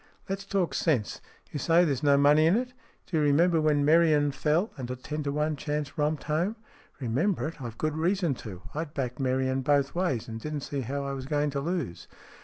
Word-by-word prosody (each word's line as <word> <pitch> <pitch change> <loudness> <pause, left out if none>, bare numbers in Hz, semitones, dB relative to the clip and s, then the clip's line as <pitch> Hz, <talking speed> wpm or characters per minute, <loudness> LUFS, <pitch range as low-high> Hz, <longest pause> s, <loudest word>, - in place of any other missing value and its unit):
" - - -35
Let's 195 0 -3
talk 195 -4 0
sense. 135 - 0 0.3
You 145 - -4
say 170 +5 +4
there's 140 -6 -1
no 140 -1 +4
money 150 +3 +5
in 170 - +4
it? 250 +1 -3 0.3
Do 165 - -2
you - - +3
remember 160 +3 +4
when 150 -2 +2
Merion 155 -2 +4
fell, 160 +9 0
and 130 -5 -6
a 125 - -2
ten 150 +4 -5
to 145 -1 -2
one 150 +1 0
chance 145 -1 -3
romped 150 -1 0
home? 170 +8 0 0.2
" - - -29
"Remember 145 - 0
it? 160 -2 -8
I've 115 -3 -6
good 155 -1 -1
reason 170 0 +1
to. 95 -4 -9
I'd 155 0 -5
backed 125 -2 -3
Merion 130 0 0
both 140 0 +2
ways, 170 -10 -1
and 115 -1 -6
didn't 150 +3 -4
see 140 0 -3
how 140 +3 -3
I 140 - -3
was 130 -1 -6
going 145 0 0
to 140 - -2
lose." 155 - -3
150 Hz, 220 wpm, -28 LUFS, 135-165 Hz, 0.3 s, money